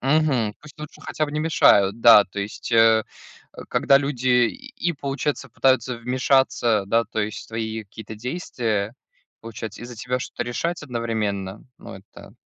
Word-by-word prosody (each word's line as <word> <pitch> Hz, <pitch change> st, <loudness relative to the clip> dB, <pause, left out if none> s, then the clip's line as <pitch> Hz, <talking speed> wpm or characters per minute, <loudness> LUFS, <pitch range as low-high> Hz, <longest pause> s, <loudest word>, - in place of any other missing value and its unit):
Мгм 135 Hz, -6 st, +1 dB
пусть 150 Hz, -1 st, -15 dB
лучше 150 Hz, -, -10 dB
хотя 155 Hz, -, -2 dB
бы 145 Hz, -, -6 dB
не 150 Hz, -, -2 dB
мешают. 110 Hz, -10 st, +4 dB
Да 115 Hz, -3 st, +8 dB
то 100 Hz, +2 st, -6 dB
есть, 105 Hz, +4 st, -6 dB
э, 115 Hz, -1 st, +5 dB, 0.5 s
а -, -, -10 dB
когда 135 Hz, 0 st, +4 dB
люди 125 Hz, -3 st, +2 dB
и 260 Hz, -8 st, -5 dB
получается 140 Hz, -1 st, -3 dB
пытаются 125 Hz, 0 st, +1 dB
вмешаться, 125 Hz, -3 st, +1 dB
да, 115 Hz, +3 st, +2 dB
то 110 Hz, 0 st, -4 dB
есть, 105 Hz, +1 st, -4 dB
в -, -, -19 dB
твои 110 Hz, -1 st, -4 dB
какие-то 110 Hz, +2 st, -10 dB
действия, 115 Hz, -, -3 dB, 0.5 s
получается, 110 Hz, -1 st, -8 dB
и -, -, -6 dB
за 120 Hz, -, -9 dB
тебя 125 Hz, +3 st, -2 dB
что-то 125 Hz, -, -5 dB
решать 165 Hz, +8 st, -3 dB
одновременно, 110 Hz, -6 st, -3 dB, 0.2 s
ну -, -, -10 dB
это -, -, -15 dB
120 Hz, 165 wpm, -23 LUFS, 110-140 Hz, 0.5 s, Да